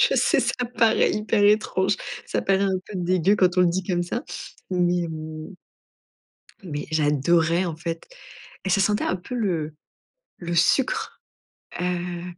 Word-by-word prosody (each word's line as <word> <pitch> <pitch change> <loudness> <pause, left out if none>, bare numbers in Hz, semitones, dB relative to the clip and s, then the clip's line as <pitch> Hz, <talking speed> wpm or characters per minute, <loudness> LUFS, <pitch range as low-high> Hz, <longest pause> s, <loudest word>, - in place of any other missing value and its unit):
Je - - +4
sais - - +3
ça 250 - -1
paraît 225 -2 +4
hyper 210 0 +1
étrange, 205 -2 +3 0.3
ça - - -1
paraît 195 0 +2
un 190 -1 +1
peu 210 - -10
dégueu 185 +2 +2
quand 185 -2 +3
on - - +7
le 180 - +5
dit 185 +2 -1
comme 175 -2 0
ça, 230 +8 -3 0.5
mais 180 -1 +2
heu 155 +2 -7 1.1
mais 150 -5 -5
j'adorais, 160 +3 +2
en 165 -3 -3
fait, 165 0 -5 0.6
et - - -1
ça 195 +1 +3
sentait 210 +1 +1
un 185 - 0
peu 185 +8 -7
le 165 -9 -1 0.6
le 175 -1 -4
sucre, 250 - +1 0.6
heu, 175 -1 -2
180 Hz, 155 wpm, -24 LUFS, 170-195 Hz, 1.1 s, on